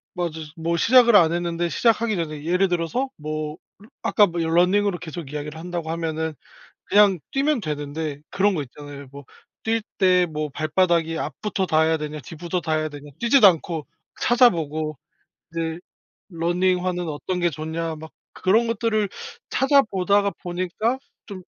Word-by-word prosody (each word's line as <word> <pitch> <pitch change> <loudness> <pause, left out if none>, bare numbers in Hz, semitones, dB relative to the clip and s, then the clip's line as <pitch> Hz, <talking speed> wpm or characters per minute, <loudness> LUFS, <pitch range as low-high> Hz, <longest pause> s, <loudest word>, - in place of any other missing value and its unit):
맞아요. 175 -2 -1 0.3
뭐 165 +1 -1
시작을 235 +4 +6
안 165 -4 +6
했는데 170 0 -1
시작하기 230 0 +2
전에 155 -3 -4
예를 180 +4 +2
들어서 175 +10 -1
뭐 155 +1 -4 0.4
아까 210 - +4
뭐 175 -1 -4
러닝으로 180 +4 +2
계속 160 -4 -8
이야기를 150 +1 -5
한다고 170 -2 -5
하면은 160 -1 -2 0.5
그냥 200 -4 +5
뛰면 280 0 +1
되는데 150 -1 -4
그런 200 +1 +2
거 150 - -1
있잖아요. 140 +1 -11
뭐 140 -1 -11 0.4
'뛸 225 0 0 0.2
때 180 -2 +4
뭐 150 0 -3
발바닥이 165 +2 +1
앞부터 205 -3 -2
닿아야 160 -1 +2
되냐. 150 0 -5
뒤부터 170 +6 -4
닿아야 155 -1 -1
되냐.' 145 0 -11
뛰지도 235 -2 +6
않고 165 -3 0 0.4
찾아보고. 160 - +2 0.5
이제 165 0 -3 0.5
'러닝화는 180 +1 0
어떤 180 +4 -3
게 175 0 +2
좋냐.' 160 +2 -4
막 160 +1 -10 0.2
그런 220 +5 +2
것들을 220 -3 0 0.4
찾아 275 +1 +4
보다가 200 0 +1
보니까 185 +8 -2 0.3
좀 190 -3 -9
170 Hz, 320 characters per minute, -23 LUFS, 155-195 Hz, 0.5 s, 시작을